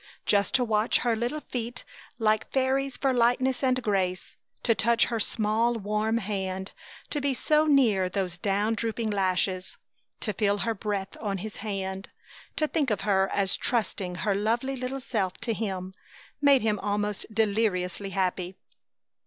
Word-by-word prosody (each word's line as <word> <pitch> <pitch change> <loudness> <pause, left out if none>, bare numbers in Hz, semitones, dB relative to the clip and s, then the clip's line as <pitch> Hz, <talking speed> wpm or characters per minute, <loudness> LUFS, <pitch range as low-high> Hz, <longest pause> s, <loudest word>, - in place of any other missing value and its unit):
Just 200 -2 +2
to 255 - +5
watch 215 0 +2
her 240 -2 +1
little 240 +7 -2
feet 240 -2 -5 0.3
like 215 -2 +1
fairies 265 0 0
for 270 -2 +1
lightness 250 +2 +2
and 255 -1 +2
grace; 190 -4 -1 0.3
to 230 - +4
touch 230 +3 +3
her 230 -2 -2
small, 220 +2 +1
warm 215 +1 0
hand; 190 -3 -3 0.4
to 295 - -1
be 275 -1 0
so 305 +4 +3
near 225 -11 +4
those 185 -2 -2
down 205 +1 +1
drooping 225 0 -2
lashes; 185 -1 0 0.4
to 210 - -1
feel 205 -1 +1
her 230 - +1
breath 200 -2 -3
on 200 -3 -1
his 215 +3 -7
hand; 195 -2 -4 0.5
to 310 - +1
think 290 -3 0
of 210 -3 0
her 195 -1 +2
as 195 -1 +2
trusting 200 -6 -1
her 205 - +3
lovely 230 +7 0
little 255 +1 -4
self 215 -8 -1
to 230 0 -1
him 190 -4 -4 0.5
made 280 -4 +5
him 210 -2 +1
almost 205 +1 -1
deliriously 205 -3 0
happy. 185 -1 -1
215 Hz, 155 wpm, -27 LUFS, 195-240 Hz, 0.5 s, to